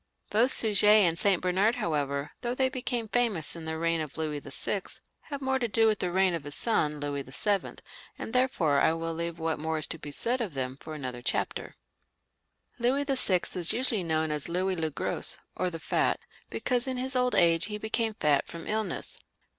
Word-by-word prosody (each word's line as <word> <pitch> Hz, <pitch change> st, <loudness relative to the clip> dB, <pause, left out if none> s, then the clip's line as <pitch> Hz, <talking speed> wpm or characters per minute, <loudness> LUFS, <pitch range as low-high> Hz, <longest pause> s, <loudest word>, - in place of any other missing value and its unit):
Both 230 Hz, +5 st, +4 dB
Suger 210 Hz, -5 st, +3 dB
and 205 Hz, -6 st, +6 dB
St. 195 Hz, -4 st, +3 dB
Bernard, 190 Hz, +6 st, +2 dB
however, 145 Hz, -2 st, -1 dB
though 240 Hz, 0 st, -2 dB
they 260 Hz, 0 st, +2 dB
became 245 Hz, -3 st, -2 dB
famous 215 Hz, -10 st, +1 dB
in 165 Hz, -1 st, -8 dB
the 160 Hz, 0 st, -3 dB
reign 165 Hz, 0 st, +1 dB
of 155 Hz, -1 st, -6 dB
Louis 155 Hz, -2 st, -2 dB
VI., -, -, -2 dB, 0.5 s
have 280 Hz, -2 st, -5 dB
more 265 Hz, 0 st, +1 dB
to 240 Hz, -, 0 dB
do 225 Hz, +1 st, +3 dB
with 215 Hz, -2 st, +3 dB
the 180 Hz, -, -1 dB
reign 190 Hz, 0 st, +3 dB
of 165 Hz, -3 st, -3 dB
his 145 Hz, +1 st, -2 dB
son, 150 Hz, -10 st, +1 dB
Louis 145 Hz, -1 st, -2 dB
VII., 190 Hz, +10 st, -1 dB, 0.4 s
and -, -, -6 dB
therefore 185 Hz, -, +2 dB
I 160 Hz, -, +4 dB
will 165 Hz, 0 st, -3 dB
leave 170 Hz, 0 st, -3 dB
what 160 Hz, -1 st, -1 dB
more 160 Hz, +1 st, -1 dB
is 155 Hz, -, -2 dB
to 165 Hz, -, -7 dB
be 145 Hz, -, -7 dB
said 240 Hz, -, 0 dB
of 195 Hz, -10 st, -4 dB
them 130 Hz, -1 st, -2 dB
for 155 Hz, +3 st, -9 dB
another 130 Hz, -4 st, -5 dB
chapter. -, -, -2 dB, 1.0 s
Louis 260 Hz, +4 st, +2 dB
VL 255 Hz, -10 st, +1 dB
is 175 Hz, -2 st, 0 dB
usually 235 Hz, -5 st, +1 dB
known 160 Hz, -1 st, 0 dB
as 150 Hz, +1 st, 0 dB
Louis 185 Hz, +2 st, 0 dB
le 160 Hz, -2 st, 0 dB
Gros, 150 Hz, -, +1 dB, 0.2 s
or 185 Hz, -, 0 dB
the 165 Hz, -2 st, -7 dB
Fat, -, -, +1 dB, 0.3 s
because 250 Hz, 0 st, 0 dB
in 260 Hz, -1 st, -2 dB
his 260 Hz, +1 st, -1 dB
old 250 Hz, 0 st, +2 dB
age 165 Hz, 0 st, +4 dB
he 210 Hz, 0 st, -4 dB
became 220 Hz, +1 st, -1 dB
fat 150 Hz, -8 st, +2 dB
from 165 Hz, -1 st, -8 dB
illness. 215 Hz, 0 st, -1 dB
180 Hz, 200 wpm, -29 LUFS, 155-230 Hz, 1.0 s, and